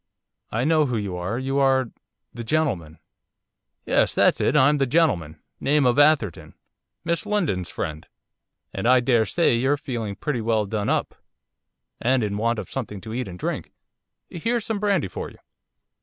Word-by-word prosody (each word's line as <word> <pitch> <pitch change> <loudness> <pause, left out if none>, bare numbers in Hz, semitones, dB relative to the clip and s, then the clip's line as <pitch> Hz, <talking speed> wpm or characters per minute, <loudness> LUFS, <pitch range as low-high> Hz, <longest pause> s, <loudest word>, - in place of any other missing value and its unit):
'I 115 +3 -1
know 155 +1 +3
who 120 -3 -1
you 100 -4 -3
are. 90 +6 -3
You 135 +2 -1
are 130 -3 +2 0.4
the 120 - -6
gentleman.' 110 - -1 0.9
'Yes, - - +2
that's - - +3
it, - - +2
I'm 145 +1 +4
the 135 - +2
gentleman, 90 - +1 0.2
name 145 0 +2
of 125 +3 +3
Atherton. 145 - +2 0.5
Miss 170 0 -1
Lindon's 160 - 0
friend. 80 0 -5 0.7
And 95 +4 -2
I 130 +1 +6
daresay 120 +5 +2
you're 130 +5 +2
feeling 120 -8 -4
pretty 135 -2 -2
well 110 -1 +1
done 105 0 -2
up, - - 0 0.9
and 130 0 +2
in 100 -1 -2
want 115 +2 0
of - - -5
something 110 -6 -5
to 110 -1 -7
eat 125 -1 -3
and 90 -1 -8
drink, - - -4 0.5
here's 230 +6 -2
some 220 -2 -2
brandy 200 - +1
for - - -6
you. - - -17
125 Hz, 165 wpm, -24 LUFS, 105-150 Hz, 0.9 s, I